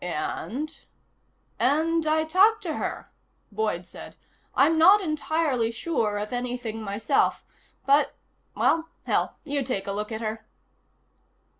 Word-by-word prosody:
"And?" 230 - -4 0.8
"And 320 +4 +2
I 315 +1 +3
talked 390 +8 +4
to - - -3
her," - - -4 0.4
Boyd 210 -4 -2
said. - - -11 0.4
"I'm 325 - +4
not 385 +6 +8
entirely 305 - 0
sure 230 -4 -1
of 210 +3 -4
anything 245 -2 -3
myself. 215 +6 0 0.4
But 280 +2 +3 0.4
well, 325 0 +2
hell. - - 0
You 290 -2 -1
take 240 -7 -3
a 200 - -3
look 210 +2 -4
at 220 0 -4
her." 220 0 -4
255 Hz, 125 wpm, -26 LUFS, 220-315 Hz, 0.8 s, not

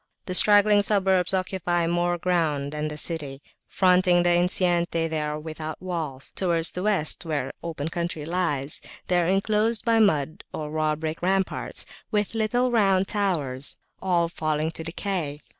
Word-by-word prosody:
The 185 - -4
straggling 205 +2 +6
suburbs 190 -3 +2
occupy 185 -2 0
more 175 +1 0
ground 160 -6 0
than 150 0 -3
the 150 0 -6
city: 150 -4 -2 0.3
fronting 180 -1 +3
the 175 - +3
enceinte 175 0 +2 0.2
they 160 -1 -2
are 150 0 -3
without 155 0 -6
walls; 160 -7 -4
towards 170 -3 +1
the 180 - -5
West, 195 -7 +1
where 150 -5 -3
open 160 -3 -4
country 170 -3 -4
lies, 155 -5 -2 0.3
they 180 -1 +3
are 170 - 0
enclosed 210 +4 +1
by 230 -1 +3
mud 155 -8 +1
or 150 -1 -5
raw 155 -1 0
brick 155 +1 -5
ramparts, 190 +1 -1 0.2
with 210 -1 0
little 240 +3 +1
round 195 -4 +3
towers, 150 - -2 0.2
all 175 -3 +2
falling 155 -1 -2
to 165 - -7
decay. 165 -3 -3
175 Hz, 155 wpm, -25 LUFS, 155-190 Hz, 0.3 s, straggling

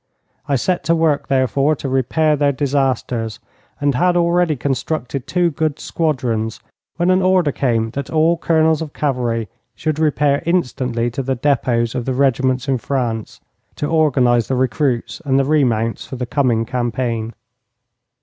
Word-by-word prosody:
I 140 - +1
set 175 +7 0
to 170 - +3
work, 160 -3 +1
therefore, 135 +3 +2
to 140 - -6
repair 135 +4 +1
their 145 -1 +2
disasters, 130 -5 -1 0.4
and 145 -1 +1
had 175 +7 +2
already 170 -2 +2
constructed 135 0 -3
two 175 -2 +1
good 155 0 -2
squadrons, 125 -9 -1 0.4
when 175 +1 +2
an 185 +1 +3
order 185 -5 +3
came 115 -5 0
that 140 +1 -5
all 160 +2 +3
colonels 160 -2 +2
of 155 -3 -6
cavalry 120 -6 -1 0.3
should 155 -1 -2
repair 150 -2 +2
instantly 125 -8 -1
to 130 - -3
the 135 0 -1
depôts 120 -3 +1
of 125 -3 -3
the 130 - -1
regiments 130 0 +1
in 135 -2 +1
France 115 -4 -3 0.3
to - - -3
organize 130 -7 +2
the 135 - 0
recruits 130 +2 -1
and 135 -3 +1
the 135 - +2
remounts 120 -7 +1
for - - -6
the 125 0 -3
coming 120 -3 +1
campaign. 120 -2 -2
135 Hz, 155 wpm, -19 LUFS, 120-155 Hz, 0.4 s, to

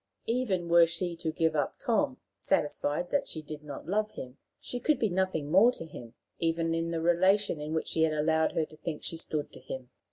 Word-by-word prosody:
Even 225 -8 0
were 170 0 +7
she 170 +1 -2
to 160 -1 -2
give 160 0 +1
up 150 - 0
Tom, 265 +1 +1 0.2
satisfied 150 -1 0
that 285 - +1
she 155 - -5
did 150 0 -7
not 145 -2 -8
love 210 +3 +1
him, 130 +1 -8 0.2
she 245 - -5
could 300 +4 +2
be 220 - +1
nothing 175 -5 -1
more 205 +8 +7
to 165 - -7
him, 120 -6 -10 0.2
even 165 0 +1
in 165 0 -1
the 165 -1 -1
relation 185 +2 +3
in 150 +1 -4
which 160 0 -1
he 160 - 0
had 160 -1 +3
allowed 160 +1 +2
her 160 - +1
to 155 - -16
think 155 -1 -5
she - - -2
stood 155 -2 -3
to - - -9
him. 130 -1 -7
165 Hz, 220 wpm, -30 LUFS, 155-190 Hz, 0.2 s, were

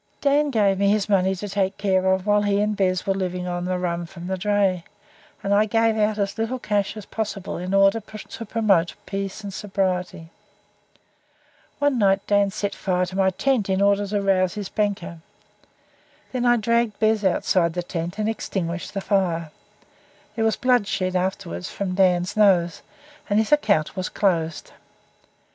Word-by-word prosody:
Dan 290 +1 +2
gave 205 -6 +2
me 200 0 +3
his 205 -1 +1
money 190 -2 +2
to 205 +3 -6
take 195 -1 -1
care 190 -2 +2
of 190 0 0
while 205 0 +3
he 205 -1 +1
and 210 0 0
Bez 185 -2 0
were 195 - +1
living 180 -1 -3
on 175 0 -3
rum 175 -2 -2
from 170 0 -10
the 190 +1 -2
dray, 195 -2 +1 0.6
and 200 0 +1
I 210 +1 +4
gave 225 +1 +2
out 215 0 +1
as 200 +1 -2
little 225 +3 -1
cash 205 -3 -1
as 210 - -8
possible 210 -3 -4
in 180 +1 -4
order 195 +2 +4
to 215 +1 -9
promote 200 -7 +2
peace 195 +1 -5
and 200 -1 -6
sobriety. 185 -5 -2 1.5
One 285 -3 +1
night 195 -1 +2
Dan 205 -1 +3
set 200 0 -3
fire 180 -2 0
to 185 +1 -8
my 190 -1 +3
tent 225 +1 0
in 190 0 +1
order 200 0 +2
to 205 0 -1
rouse 185 -1 +2
his 205 -2 -5
banker. 200 -5 -2 1.1
I 240 -1 +3
dragged 230 0 +1
Bez 220 -1 +2
outside 175 -2 +2
the 175 0 -3
tent 170 +1 -5
and 215 0 -1
extinguished 180 -5 -3
the 195 - -1
fire. 175 -6 0 0.8
There 225 - -1
was 220 - +2
bloodshed 205 -7 +1
afterwards 180 - -2
from 195 -2 -3
Dan's 180 -1 +2
nose 185 -5 +3 0.5
and 205 - +2
his 220 +4 +1
account 210 - +2
was 185 -1 -3
closed. 165 -5 -1
195 Hz, 170 wpm, -23 LUFS, 185-210 Hz, 1.5 s, I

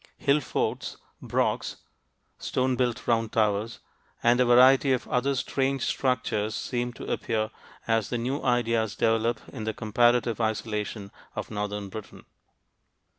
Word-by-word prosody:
Hill 140 +1 +3
forts, 140 - -2 0.2
"brochs" - - -1 0.6
(stone 130 0 0
built 125 -1 -1
round 115 -2 +1
towers) 105 +1 +1 0.5
and 120 +1 +4
a 125 - +5
variety 130 +3 +6
of 125 - -2
other 135 +3 +1
strange 135 0 0
structures 110 -5 0
seem 120 -1 -2
to - - -9
appear 110 -1 -1 0.4
as 115 -2 +1
the 120 - -1
new 130 +5 -2
ideas 115 -3 +1
develop 115 0 +1
in 110 - -7
the 110 0 -3
comparative 120 +1 +2
isolation 105 -2 -2 0.2
of - - -5
northern 105 -1 -3
Britain. 110 +1 -9
115 Hz, 130 wpm, -27 LUFS, 110-125 Hz, 0.6 s, variety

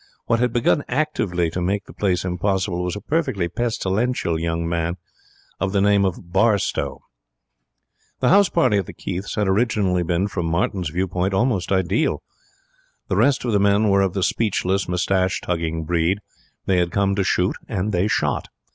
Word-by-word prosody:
What 115 - +1
had 125 -1 +1
begun 120 +4 +2
actively 105 - 0
to 90 - -3
make 100 +3 -1
the - - -13
place 95 -3 0
impossible 90 0 -1
was 90 -1 -2
a 105 - -6
perfectly 110 - -1
pestilential 110 -2 -1
young 85 0 -2
man 85 +1 -1 0.6
of 95 +1 -1
the 100 - +2
name 100 0 +4
of 90 -1 -4
Barstowe. 100 0 +1 1.2
The - - +2
house 200 0 +5
party 130 -11 +2
at 95 - -4
the - - -8
Keiths 95 +3 -5
had 105 -2 0
originally 95 -3 +1
been, 85 +3 0
from 90 -4 -3
Martin's 85 +1 -1
view 90 +5 -1
point, 95 +1 -1
almost 105 -4 0
ideal. 95 - +1 0.9
The - - +1
rest 140 -2 +2
of 120 - 0
the 100 - +3
men 100 +1 +3
were 100 0 +4
of 95 -2 0
the 95 - 0
speechless, 100 -3 0
moustache 95 +1 +1
tugging 80 -2 -2
breed. 85 +3 +1 0.5
They 95 - +2
had 90 -1 +2
come 100 +1 +1
to 100 0 +1
shoot, 90 +1 +1
and 105 -1 -2
they 90 +1 +1
shot. - - 0
95 Hz, 175 wpm, -22 LUFS, 90-105 Hz, 1.2 s, house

